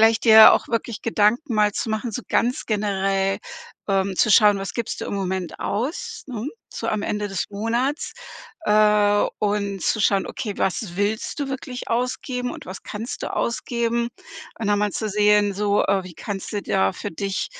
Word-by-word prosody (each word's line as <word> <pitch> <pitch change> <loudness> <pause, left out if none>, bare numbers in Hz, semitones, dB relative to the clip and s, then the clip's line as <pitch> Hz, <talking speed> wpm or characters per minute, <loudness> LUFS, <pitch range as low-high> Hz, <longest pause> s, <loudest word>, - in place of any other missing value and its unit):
vielleicht 225 0 +4
dir 220 -1 +10
auch - - +1
wirklich 230 -1 -2
Gedanken 230 +4 +1
mal 210 -1 +4
zu 225 - -3
machen, 220 +2 -2
so 250 +4 -5
ganz 245 +2 0
generell, 195 -2 0 0.5
ähm, 195 -1 +1
zu 215 - +3
schauen: 205 -2 +6
Was 195 0 -5
gibst 235 -2 -3
du - - -3
im - - -4
Moment 190 -3 -3
aus, 360 - -3
ne? 245 -1 -4 0.2
So - - -4
am 215 -1 -1
Ende 210 0 -2
des 195 -2 -2
Monats, 235 +8 -1 0.5
äh, 210 -1 +4
und 200 -2 -1
zu 215 - 0
schauen: 200 -2 +2
Okay, 210 -3 -5
was 185 -1 -2
willst 210 - -1
du 285 -2 -2
wirklich 260 -2 -6
ausgeben 250 +1 -2
und - - -9
was 185 +1 -8
kannst 220 +4 -6
du - - -3
ausgeben? 235 0 -1 0.5
Und 225 - -3
dann 205 0 +2
mal 210 - +1
zu 220 - -2
sehen, 210 0 +3
so, 205 +1 +1
äh, 195 -1 +2
wie 180 -2 -10
kannst 195 +3 -5
du 205 -2 -2
da 95 -8 +1
für - - -6
dich 195 +2 -2
210 Hz, 185 wpm, -23 LUFS, 200-235 Hz, 0.5 s, dir